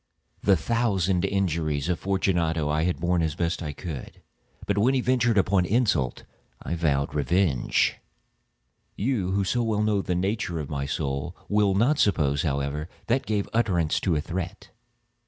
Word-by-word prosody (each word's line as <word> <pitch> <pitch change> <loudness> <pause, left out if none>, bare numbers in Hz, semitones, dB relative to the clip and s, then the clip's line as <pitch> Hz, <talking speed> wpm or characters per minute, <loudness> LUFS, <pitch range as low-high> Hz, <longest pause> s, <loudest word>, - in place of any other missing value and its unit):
The 100 -2 +4
thousand 95 -4 +1
injuries 80 -7 0
of 90 -2 0
Fortunato 85 -5 0
I 75 +2 +1
had 90 - -1
borne 85 +1 +1
as 80 -2 0
I - - -23
best 85 0 -1
could; 75 -8 -7 0.5
but 100 0 0
when 130 +6 +3
he - - +2
ventured 120 -3 +2
upon 95 -1 +3
insult, 95 - +1 0.4
I - - -4
vowed 70 -5 0
revenge. 75 -2 +1 1.0
You, 105 -5 -1
who 100 0 +1
so 120 +6 0
well 110 -2 0
know 105 -2 +2
the 90 - -2
nature 95 -2 -1
of 75 -1 -6
my 70 -1 -2
soul, 70 +3 -3
will 105 -2 +2
not 130 +9 +3
suppose, 75 -8 +2
however, 70 +1 -2 0.2
that 130 +3 +1
I - - -23
gave 105 -2 -1
utterance 90 -9 +1
to 90 -4 0
a 75 - +1
threat. 85 +3 -5
90 Hz, 165 wpm, -26 LUFS, 80-105 Hz, 1.0 s, The